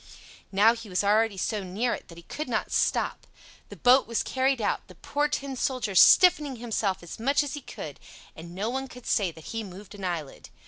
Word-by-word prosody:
Now 205 +4 +5
he 230 -2 -9
was 185 +2 0
already 210 0 +2
so 210 +2 -2
near 205 +7 -1
it - - -7
that 170 - -13
he 170 - -12
could 300 - -6
not - - -2
stop. - - 0 0.4
The - - -9
boat 255 +2 +4
was 230 -1 -1
carried 265 0 0
out, 215 - -1
the - - -14
poor 290 +1 -1
Tin 280 -2 -3
Soldier 255 -5 -2
stiffening 295 - +6
himself 215 -5 -2
as 170 - -9
much 275 +6 +2
as 285 -2 -5
he 290 - -5
could, 150 - -8 0.4
and 170 +2 -10
no 200 +3 -2
one 265 +1 -3
could 250 -1 -13
say 200 -5 +1
that 160 -1 -12
he 225 0 -3
moved 195 +1 -11
an 200 -1 -10
eyelid. 170 -6 -5
225 Hz, 215 wpm, -27 LUFS, 190-260 Hz, 0.4 s, stiffening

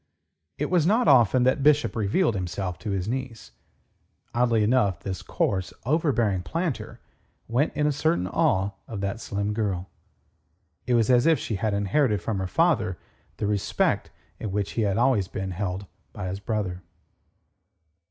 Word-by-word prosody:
It 150 - -2
was 170 -3 +3
not 220 +3 +3
often 125 -3 +5
that 130 +3 +2
Bishop 145 -6 +3
revealed 115 - +1
himself 90 -1 -3
to 105 - -5
his 95 -1 -2
niece. 125 -1 -5 0.8
Oddly 120 -2 +2
enough, 105 -4 +2
this 95 -2 -4
coarse, 95 -2 -1
overbearing 125 - +1
planter 165 - -3 0.5
went 125 +7 +1
in 150 - +1
a 150 - +3
certain 145 - +1
awe 95 +1 +1 0.2
of 105 -4 -5
that 100 +3 -3
slim 100 0 -2
girl. 100 -4 -2 1.0
It 125 - +3
was 115 +1 +3
as 120 +3 +4
if 165 -2 +5
she 110 - -3
had 105 0 0
inherited 105 +3 +1
from 110 -4 -3
her 95 - -2
father 120 - +1 0.4
the 105 - -2
respect 100 -1 0 0.3
in 105 - -4
which 100 0 -1
he 115 - -1
had 100 -1 +1
always 120 -6 +3
been 95 -1 -4
held 95 +1 -3 0.3
by 90 - -4
his 95 +2 -4
brother. 100 -4 -3
110 Hz, 160 wpm, -26 LUFS, 100-130 Hz, 1.0 s, often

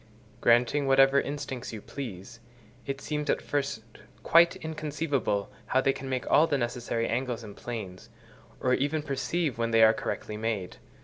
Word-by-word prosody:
Granting 125 +4 +3
whatever 135 +1 +5
instincts 140 -3 -5
you 110 - -6
please, 115 -2 -8 0.5
it 135 -1 -3
seems 150 +1 -3
at - - +2
first 140 -6 -2 0.4
quite 170 +1 +6
inconceivable 150 -9 -2 0.2
how 130 - +2
they 135 0 +2
can 135 0 -7
make 130 -2 -2
all 160 - +5
the 145 -3 +1
necessary 120 -1 -2
angles 120 -1 -2
and 105 -2 -10
planes, 105 -7 -7 0.5
or 125 - +1
even 145 +4 0
perceive 150 -1 -2
when 115 0 +1
they 115 -1 +5
are 110 0 +7
correctly 105 - -4
made. 110 -4 -3
130 Hz, 160 wpm, -28 LUFS, 115-145 Hz, 0.5 s, are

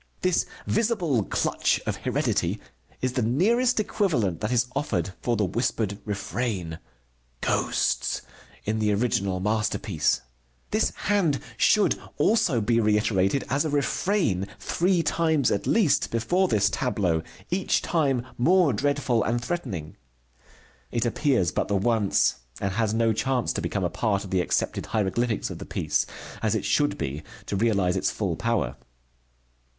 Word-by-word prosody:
This 185 -1 +2 0.2
visible 185 - +1
clutch - - 0
of - - -2
heredity - - 0 0.4
is 130 -1 0
the 125 - 0
nearest 225 - +2
equivalent 150 - 0
that 105 - -1
is 125 0 +3
offered 95 - -1
for 120 -2 0
the 105 - +2
whispered 105 0 -1
refrain: 100 -5 -3 0.6
"Ghosts," - - 0 0.4
in 110 +1 0
the 105 -1 +2
original 100 -4 0
masterpiece. 105 - 0 0.5
This - - +2 0.2
hand 180 -9 +2 0.2
should 210 - +3 0.2
also 205 - +3
be 115 +2 +2
reiterated 105 +1 +2
as 140 +2 +1
a 155 - -1
refrain, 145 - 0
three 175 - +1
times 160 -7 +2
at 100 - -1
least, 205 -10 +3
before 175 +12 +1
this 105 - +2
tableau, 95 -11 0 0.3
each 185 +1 +1
time 135 -7 +1
more 170 +2 +4
dreadful 130 -2 +1
and 120 +2 0
threatening. 110 - -4 0.9
It 120 0 -1
appears 120 - +1
but - - -1
the 100 - 0
once, 105 0 +2 0.2
and 100 - -1
has 110 0 +1
no 115 0 +2
chance 125 +2 0
to - - -2
become 100 - -2
a 90 - +1
part 100 +1 0
of 95 - -9
the 95 -1 +2
accepted - - -1
hieroglyphics 110 +2 0
of - - -7
the - - -7
piece, - - 0 0.3
as 110 -1 +1
it 100 -3 -2
should 145 +8 +2
be, 70 +3 -3 0.2
to - - -3
realize 100 -4 +2
its 95 - +1
full 95 -6 -2
power. 115 +4 -1
115 Hz, 145 wpm, -26 LUFS, 100-145 Hz, 0.9 s, more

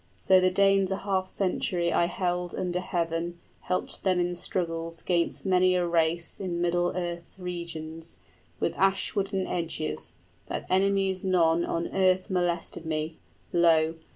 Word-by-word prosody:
So 185 - +4
the 185 0 +4
Danes 195 0 +3
a 190 - 0
half 190 -2 -1
century 180 -3 0
I 170 - +4
held 175 0 -2
under 180 -1 -1
heaven, 170 -1 -2 0.2
helped 185 - -2
them 185 -2 +2
in 175 0 0
struggles 165 -2 -3
'Gainst 170 +1 0
many 185 -1 +4
a 180 -1 +2
race 170 0 0
in 180 -3 -3
middle 175 0 +1
earth's 175 -1 -4
regions, 165 -3 -6 0.4
With 165 - 0
ash 195 0 +2
wood 200 -1 -1
and 190 -2 -1
edges, 165 -3 -3 0.3
that - - -4
enemies 195 0 +2
none 170 -3 +3
On 170 0 -1
earth 185 0 +2
molested 175 -2 -1
me. 155 0 -3 0.3
Lo! 165 -2 +4
175 Hz, 150 wpm, -28 LUFS, 170-185 Hz, 0.4 s, So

